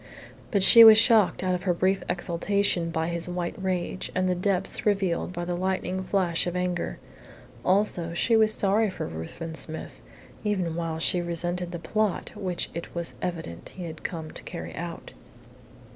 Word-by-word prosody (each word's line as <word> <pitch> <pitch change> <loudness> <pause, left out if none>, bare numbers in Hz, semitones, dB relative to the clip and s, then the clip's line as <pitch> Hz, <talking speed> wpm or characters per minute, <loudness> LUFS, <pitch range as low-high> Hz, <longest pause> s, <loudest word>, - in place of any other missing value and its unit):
But 200 -3 +2
she 230 +4 +10
was 220 -1 +10
shocked 225 -5 +4
out 185 -1 +1
of 180 - -2
her 180 -2 0
brief 190 +2 +1
exultation 175 0 0
by 160 0 -1
his 170 0 -3
white 175 -1 -3
rage 185 0 -2
and 185 0 +1
the 180 - +2
depths 190 +1 -1
revealed 195 -5 0
by 175 -1 -4
the 175 - -2
lightning 185 0 -2
flash 180 -3 +1
of 175 - -3
anger. 180 -1 -2 0.7
Also 180 -3 +1
she 230 +6 +2
was 220 -1 +4
sorry 210 +1 +2
for 185 - -5
Ruthven 80 - -7
Smith, 160 0 -4 0.4
even 190 -6 -1
while 165 -1 -3
she 175 +2 +2
resented 175 +1 -2
the 175 - -4
plot 215 +4 -1
which 185 -4 -3
it 170 +1 -7
was 170 -1 -3
evident 165 - -5
he 185 - -7
had 160 -2 -7
come 160 -3 -5
to - - -6
carry - - -7
out. 170 0 -7
180 Hz, 175 wpm, -26 LUFS, 170-195 Hz, 0.7 s, she